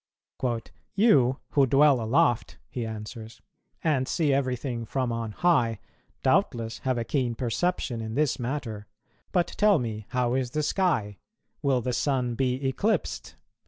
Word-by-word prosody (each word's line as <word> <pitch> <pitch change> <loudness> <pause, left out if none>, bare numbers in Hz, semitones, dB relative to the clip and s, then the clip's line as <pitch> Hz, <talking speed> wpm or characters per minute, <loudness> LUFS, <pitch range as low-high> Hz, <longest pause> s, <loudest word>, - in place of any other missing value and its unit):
"You, 140 - +4
who 140 -2 +4
dwell 140 -1 +5
aloft," 120 +1 +1
he 120 -3 -3
answers, 110 +1 -8 0.4
"and 140 -5 +1
see 155 -5 +1
everything 130 -3 -1
from 125 +2 -2
on 115 -1 -3
high, 120 - +2 0.4
doubtless 115 -1 +1
have 130 -2 -1
a 120 - 0
keen 120 -1 -1
perception 125 0 -1
in 110 0 -5
this 150 -2 +1
matter; 120 -5 -4 0.4
but 175 -2 +3
tell 210 -2 +3
me, 110 -5 -4
how 125 -1 0
is 130 -1 0
the 150 +4 -1
sky? 145 - 0 0.4
will 135 -4 +2
the 125 +2 -2
Sun 125 -1 0
be 130 +2 0
eclipsed? 210 +11 -1
125 Hz, 140 wpm, -27 LUFS, 115-145 Hz, 0.4 s, dwell